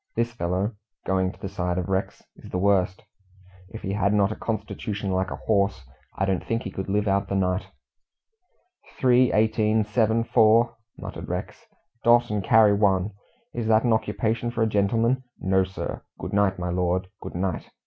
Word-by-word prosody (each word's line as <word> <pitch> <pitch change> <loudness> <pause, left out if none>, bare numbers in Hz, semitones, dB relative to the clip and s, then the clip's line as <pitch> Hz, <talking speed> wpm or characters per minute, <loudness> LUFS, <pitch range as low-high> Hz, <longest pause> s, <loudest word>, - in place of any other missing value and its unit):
This 115 +1 0
fellow" 95 0 -1 0.3
going 95 -1 +1
to - - -19
the - - -5
side 90 -2 -2
of 90 - -2
Rex 95 0 -2
"is - - -13
the - - -3
worst. 95 -1 +1 0.7
If 110 - -9
he 95 - -2
had 100 0 +1
not 100 0 +3
a - - -3
constitution 105 -2 -4
like 95 +1 0
a - - -4
horse, 100 -7 0 0.3
I 95 - +1
don't 95 -2 -1
think 115 0 -2
he - - -5
could 95 0 -5
live 105 +1 +1
out 100 0 +1
the 100 - -2
night." 90 0 0 1.3
"Three, 125 -1 +4
eighteen, 110 0 +2
seven, 110 +1 +1
four," 115 0 +4 0.2
muttered - - -7
Rex; - - -5 0.4
"dot 120 -1 +4
and 105 -2 -1
carry 110 +1 +5
one. 100 -1 +2 0.4
Is 115 -2 -3
that 110 0 +4
an 120 -2 +3
occupation 110 +2 -1
for 120 -1 0
a - - +2
gentleman? 115 +5 +1 0.2
No, 95 0 +2
sir. 95 0 -5 0.2
Good - - -6
night, 100 -2 +2
my 90 -1 -3
lord, 90 +1 0
good - - -8
night. 90 -1 -2
100 Hz, 180 wpm, -25 LUFS, 95-110 Hz, 1.3 s, carry